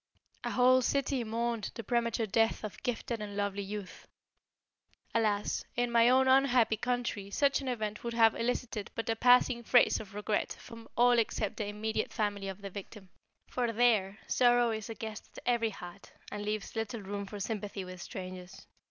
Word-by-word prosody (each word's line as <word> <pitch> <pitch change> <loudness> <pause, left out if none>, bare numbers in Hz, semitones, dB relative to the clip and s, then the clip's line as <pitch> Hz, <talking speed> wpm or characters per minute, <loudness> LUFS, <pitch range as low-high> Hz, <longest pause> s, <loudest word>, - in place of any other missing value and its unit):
A - - -2
whole 255 +1 +5
city 275 0 0
mourned 230 -1 -2
the 230 - -5
premature 235 0 0
death 225 +3 +1
of 215 - -7
gifted 235 -1 -3
and 205 -1 -6
lovely 200 0 -1
youth. 200 -1 -7 1.1
Alas! 210 -3 +1
In 245 0 0
my 235 0 +5
own 260 +1 +5
unhappy 255 -4 +4
country 235 -3 -2
such 280 +7 +2
an 270 - -6
event 215 -4 -3
would 235 -1 -3
have 225 -1 +6
elicited 230 -3 -2
but 225 0 -1
a - - 0
passing 245 0 +5
phrase 245 +1 +4
of 200 -2 -10
regret 210 0 -1
from 230 -1 -11
all 245 0 +5
except 215 -2 -1
the 210 - -2
immediate 215 +1 -2
family 205 -2 -2
of 195 +1 -7
the 200 - -6
victim; 200 0 -9 0.4
for 245 -2 -1
there 220 -4 +2
sorrow 245 -1 +4
is 220 -1 -4
a 225 - -5
guest 220 0 -7
at - - -9
every 235 -2 +2
heart, 195 -1 -11 0.2
and 205 - -4
leaves 210 +1 -3
little 225 0 -3
room 200 +1 -5
for 205 +1 -7
sympathy 205 -2 -4
with 185 -1 -9
strangers. 185 -1 -8
225 Hz, 180 wpm, -31 LUFS, 205-240 Hz, 1.1 s, have